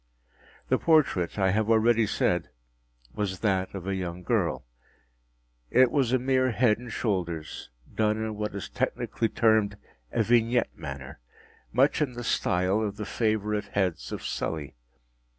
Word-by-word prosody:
The -, -, +3 dB
portrait, 140 Hz, -, +2 dB
I 95 Hz, -2 st, +3 dB
have 110 Hz, +2 st, 0 dB
already 115 Hz, 0 st, +4 dB
said, 90 Hz, -3 st, 0 dB, 0.6 s
was 95 Hz, -3 st, -3 dB
that 95 Hz, -3 st, +1 dB
of 95 Hz, -2 st, -6 dB
a 95 Hz, -, -1 dB
young 90 Hz, -1 st, -4 dB
girl. -, -, 0 dB, 1.0 s
It 125 Hz, 0 st, +5 dB
was 135 Hz, -5 st, +1 dB
a 130 Hz, -, +4 dB
mere 130 Hz, 0 st, +2 dB
head 110 Hz, -2 st, +3 dB
and 120 Hz, -1 st, -9 dB
shoulders, 85 Hz, -9 st, -3 dB, 0.2 s
done 110 Hz, 0 st, +1 dB
in 110 Hz, -1 st, -3 dB
what 105 Hz, -1 st, -4 dB
is 100 Hz, -, -5 dB
technically 115 Hz, -, -2 dB
termed 110 Hz, -2 st, +2 dB, 0.3 s
a 115 Hz, -, +1 dB
vignette 120 Hz, +1 st, +2 dB
manner; 70 Hz, -4 st, -8 dB, 0.5 s
much 135 Hz, +6 st, +3 dB
in 140 Hz, -4 st, 0 dB
the 120 Hz, 0 st, -6 dB
style 95 Hz, -1 st, +1 dB
of 105 Hz, -2 st, -3 dB
the 105 Hz, -, -4 dB
favorite 105 Hz, -2 st, -1 dB
heads 90 Hz, -11 st, -2 dB
of -, -, -5 dB
Sully. 75 Hz, -4 st, -3 dB
105 Hz, 150 wpm, -27 LUFS, 95-115 Hz, 1.0 s, It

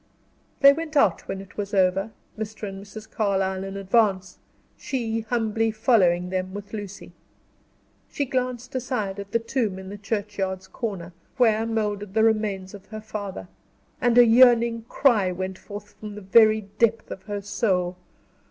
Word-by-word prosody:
They 280 Hz, 0 st, +9 dB
went 310 Hz, 0 st, -4 dB
out 210 Hz, -10 st, +3 dB
when 195 Hz, -, -4 dB
it 195 Hz, -, -15 dB
was 205 Hz, 0 st, -3 dB
over. 190 Hz, +2 st, +2 dB, 0.3 s
Mr. 215 Hz, 0 st, -5 dB
and 195 Hz, 0 st, -8 dB
Mrs. 215 Hz, +2 st, -10 dB
Carlyle 190 Hz, -3 st, -1 dB
in 195 Hz, 0 st, -6 dB
advance; 195 Hz, -2 st, +1 dB, 0.4 s
she, 230 Hz, -4 st, -2 dB
humbly 225 Hz, -1 st, 0 dB
following 185 Hz, -6 st, +2 dB
them 185 Hz, 0 st, -3 dB
with 205 Hz, +1 st, -8 dB
Lucy. 205 Hz, -2 st, -7 dB, 1.0 s
She 285 Hz, -, -2 dB
glanced 255 Hz, -1 st, -3 dB
aside 245 Hz, -6 st, -2 dB
at 200 Hz, 0 st, -8 dB
the -, -, +3 dB
tomb 230 Hz, -4 st, -2 dB
in 190 Hz, 0 st, -8 dB
the 205 Hz, +1 st, -8 dB
churchyard's 195 Hz, -2 st, -3 dB
corner, 190 Hz, -6 st, -5 dB, 0.2 s
where 225 Hz, -3 st, +3 dB
moldered 210 Hz, -3 st, -2 dB
the 220 Hz, -, +4 dB
remains 210 Hz, -4 st, 0 dB
of 200 Hz, -2 st, -12 dB
her 215 Hz, -, -7 dB
father; 205 Hz, -, -6 dB, 0.5 s
and 245 Hz, -1 st, +3 dB
a 245 Hz, -, +9 dB
yearning 235 Hz, -1 st, +5 dB
cry 215 Hz, -9 st, +3 dB
went 185 Hz, +1 st, -5 dB
forth 205 Hz, 0 st, -10 dB
from 210 Hz, -1 st, -7 dB
the 210 Hz, -, -8 dB
very 215 Hz, +2 st, +5 dB, 0.2 s
depth 230 Hz, -1 st, +2 dB
of 190 Hz, -, -6 dB
her 205 Hz, -1 st, -4 dB
soul. 185 Hz, -3 st, 0 dB
210 Hz, 160 wpm, -24 LUFS, 195-225 Hz, 1.0 s, They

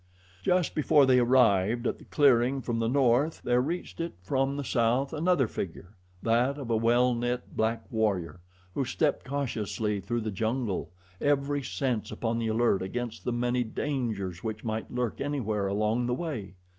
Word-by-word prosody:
Just 180 Hz, -, +1 dB
before 150 Hz, -2 st, +4 dB
they 130 Hz, -1 st, +5 dB
arrived 120 Hz, -2 st, +3 dB
at -, -, -1 dB
the -, -, -14 dB
clearing 135 Hz, -2 st, +3 dB
from 115 Hz, -1 st, -1 dB
the 115 Hz, -, +1 dB
north 135 Hz, +4 st, +2 dB
there 125 Hz, 0 st, +3 dB
reached 170 Hz, +5 st, -4 dB
it 165 Hz, 0 st, -3 dB
from 135 Hz, +7 st, 0 dB
the 145 Hz, -, -2 dB
south 125 Hz, +3 st, +1 dB
another 160 Hz, -4 st, +2 dB
figure 95 Hz, +1 st, -6 dB, 0.3 s
that 120 Hz, +5 st, +2 dB
of 130 Hz, -5 st, -5 dB
a -, -, +3 dB
well 120 Hz, +3 st, +3 dB
knit 120 Hz, +1 st, -3 dB
black 110 Hz, +1 st, 0 dB
warrior, 95 Hz, -7 st, 0 dB, 0.3 s
who 140 Hz, -, 0 dB
stepped 145 Hz, +3 st, 0 dB
cautiously 110 Hz, -6 st, -2 dB
through 120 Hz, +5 st, -2 dB
the 110 Hz, -1 st, -3 dB
jungle, 110 Hz, 0 st, -2 dB, 0.3 s
every 145 Hz, 0 st, +1 dB
sense 115 Hz, +1 st, -2 dB
upon 115 Hz, 0 st, -2 dB
the 115 Hz, -, -1 dB
alert 110 Hz, -2 st, +2 dB
against 120 Hz, +5 st, -4 dB
the 125 Hz, -, 0 dB
many 120 Hz, +1 st, 0 dB
dangers 110 Hz, -, -3 dB
which 110 Hz, -1 st, -4 dB
might 110 Hz, -1 st, -3 dB
lurk 125 Hz, -2 st, -2 dB
anywhere 110 Hz, -8 st, -1 dB
along 110 Hz, +4 st, 0 dB
the 125 Hz, -, 0 dB
way. 125 Hz, -, -5 dB
120 Hz, 170 wpm, -28 LUFS, 110-135 Hz, 0.3 s, they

